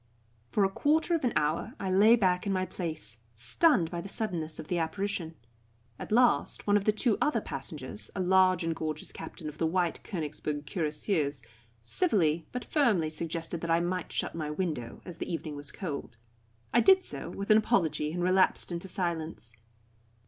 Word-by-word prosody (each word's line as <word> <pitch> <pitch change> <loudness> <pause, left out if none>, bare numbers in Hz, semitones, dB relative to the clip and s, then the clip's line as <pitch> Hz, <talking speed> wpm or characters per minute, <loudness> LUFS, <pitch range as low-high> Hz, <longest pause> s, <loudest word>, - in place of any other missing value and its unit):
For 205 - +2
a - - +2
quarter 315 - +1
of 330 - +1
an 245 - +2
hour 155 - 0
I 190 -1 -2
lay 210 +5 +7
back 185 -3 +1
in - - +1
my 185 -1 +1
place, 155 - -4 0.2
stunned 165 - +3
by 170 -1 -3
the 195 - -8
suddenness 175 -8 -2
of 155 - -7
the 175 0 0
apparition. 170 -1 -2 0.6
At - - -7
last 245 +2 +3
one 205 - +3
of 205 -1 +2
the 215 - +5
two 215 +1 +1
other 295 -6 +2
passengers, 130 - -4
a - - -3
large 185 -1 +4
and 165 0 -1
gorgeous 155 -1 -3
captain 160 0 -8
of 150 0 -8
the 165 - +2
White 175 0 0
Königsberg 150 -4 -4
Cuirassiers, 150 - -1 0.4
civilly 170 - +1
but 250 - -4
firmly 210 - +2
suggested 165 +1 -3
that 170 - -4
I 165 0 +4
might 175 +1 -2
shut - - -2
my 155 -2 -3
window, 150 -7 -3
as 175 -2 -7
the - - -4
evening 160 -3 -4
was 145 0 -5
cold. 145 - -6 0.6
I 240 - +6
did 380 +7 +6
so, - - -5
with 200 +2 -2
an 215 - +8
apology, 160 -9 +1
and 175 +1 -2
relapsed 185 0 +3
into 175 +2 -3
silence. 165 - -3
175 Hz, 185 wpm, -30 LUFS, 155-200 Hz, 0.6 s, an